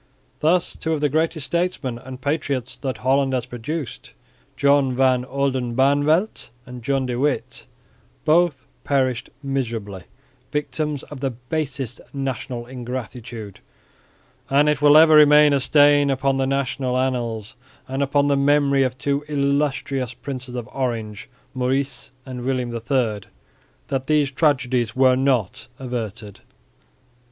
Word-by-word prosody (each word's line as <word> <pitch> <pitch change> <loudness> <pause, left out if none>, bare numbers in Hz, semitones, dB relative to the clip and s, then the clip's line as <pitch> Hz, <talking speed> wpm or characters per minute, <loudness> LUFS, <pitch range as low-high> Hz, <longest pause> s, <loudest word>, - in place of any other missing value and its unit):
Thus 170 +3 +2
two 160 - -2
of 150 - -2
the 150 - +2
greatest 155 0 0
statesmen 170 -9 -2
and 130 +1 -9
patriots 140 -3 -2
that 130 -5 -4
Holland 135 0 +2
has 125 -2 -1
produced, 125 +3 -6 0.4
John 140 -2 +3
van 130 -1 +3
Oldenbarneveldt 140 - +1 0.2
and 125 -1 -9
John 135 +2 0
de 125 -1 -3
Witt, 145 0 -2 0.6
both 155 -5 +3 0.2
perished 130 -3 0
miserably, 115 -9 -3 0.5
victims 150 -1 -2
of 145 - -10
the 135 0 -1
basest 130 0 -4
national 130 -3 -4
ingratitude; 120 -4 -7 0.9
and 145 +2 +4
it 150 -1 +1
will 145 0 +7
ever 160 0 +7
remain 150 -1 +7
a 140 - +3
stain 145 +1 +4
upon 135 0 +1
the 135 0 0
national 130 -1 -1
annals 120 -3 -2 0.3
and 135 +1 -3
upon 140 +1 +2
the 145 -1 +3
memory 140 0 +3
of 130 -1 0
two 140 +2 -1
illustrious 140 -3 -1
Princes 130 -2 -7
of 120 -3 -5
Orange, 115 -6 -3 0.2
Maurice 130 +2 -2
and 130 -2 -7
William 125 -1 -2
III, 115 -2 0 0.7
that 135 -1 -2
these 150 -2 +2
tragedies 130 -6 +1
were 130 -1 +5
not 130 -8 0
averted. 115 -5 -5
135 Hz, 130 wpm, -22 LUFS, 125-145 Hz, 0.9 s, will